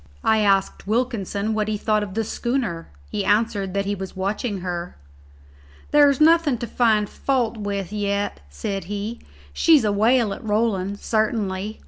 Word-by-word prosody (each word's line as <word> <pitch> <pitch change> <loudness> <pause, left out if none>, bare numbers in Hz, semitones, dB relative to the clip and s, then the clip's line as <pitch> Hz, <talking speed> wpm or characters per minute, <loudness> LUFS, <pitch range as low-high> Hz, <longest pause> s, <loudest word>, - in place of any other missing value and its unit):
I 220 0 +3
asked 195 -2 +1
Wilkinson 220 -3 -1
what 215 -1 0
he 215 -1 -1
thought 215 0 +1
of 200 -2 -6
the 225 - 0
schooner. 235 -7 -2 0.2
He 205 - -1
answered 205 -2 +1
that 200 0 0
he 200 - -1
was 190 -1 -6
watching 200 +1 -2
her. 175 -1 -4 1.0
"There's 290 -2 +5
nothing 315 -4 +4
to 235 - -4
find 220 -3 +2
fault 245 -3 -1
with 200 -2 -4
yet," 205 -1 -1
said 195 - -4
he; 205 +4 -4 0.3
"she's 305 - +4
a 210 - +2
whale 220 +1 +3
at - - -9
rolling, 205 -3 0
sartinly. 215 -2 -1
210 Hz, 155 wpm, -23 LUFS, 200-230 Hz, 1.0 s, There's